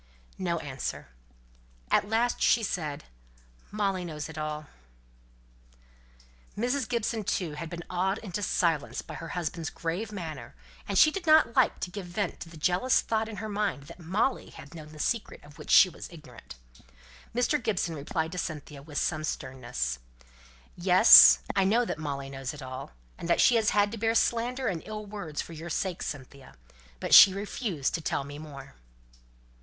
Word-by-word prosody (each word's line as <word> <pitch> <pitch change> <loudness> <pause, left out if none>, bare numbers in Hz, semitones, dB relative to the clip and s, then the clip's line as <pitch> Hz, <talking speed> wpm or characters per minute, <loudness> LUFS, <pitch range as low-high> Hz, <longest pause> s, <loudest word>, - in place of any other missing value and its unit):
No 175 -2 -1
answer. 135 - -5 0.8
At 205 - +2
last 235 +2 0
she 235 - +4
said, 155 -7 -3 0.7
"Molly 200 -3 -1
knows 155 -3 -6
it 160 - -10
all." 155 0 -4 1.9
Mrs. 245 +2 -1
Gibson, 230 -2 -1
too, 185 -4 -2
had 160 +2 -6
been 170 0 -7
awed 190 +3 -1
into 205 -3 -5
silence 165 -6 0
by - - -10
her 165 - -7
husband's 165 -1 -3
grave 180 +6 -4
manner, 165 - -7 0.3
and 200 - -1
she 310 - +7
did 355 0 -6
not 310 -7 +5
like 260 -3 +3
to 180 - -4
give 195 -2 -7
vent 180 +1 -3
to 165 - -8
the 165 - -12
jealous 185 +10 +2
thought 220 0 -1
in 220 - -7
her 215 +2 -5
mind 205 -8 -2
that 145 - -13
Molly 200 +10 -1
had 140 - -13
known 155 -2 -10
the 155 - -13
secret 225 +8 -3
of 150 +2 -16
which 150 - -10
she - - +8
was 180 - -10
ignorant. 125 - -13 0.8
Mr. 245 +1 +1
Gibson 200 -7 -1
replied 160 +2 -3
to 180 - -4
Cynthia 150 -4 -6
with 145 +1 -8
some 155 -3 -1
sternness: 120 - -4 0.8
"Yes! 180 +5 +8
I 195 - +3
know 225 +6 +2
that 155 - -4
Molly 140 -3 -5
knows 135 0 -5
it 145 - -10
all, 130 - -8 0.3
and 170 - -6
that 170 - +3
she - - +6
has 220 -2 +2
had 205 0 +2
to 230 - -6
bear 225 +1 +1
slander 245 +3 0
and 175 -8 -1
ill 215 0 -7
words 195 -8 -5
for 170 - -11
your 165 +2 -8
sake, 180 +2 -2
Cynthia. 140 -1 -8 0.4
But - - -2
she 195 -1 +10
refused 200 - -3
to 165 - -2
tell 145 - -2
me 145 +1 -9
more." 140 - -10
175 Hz, 175 wpm, -28 LUFS, 150-210 Hz, 1.9 s, she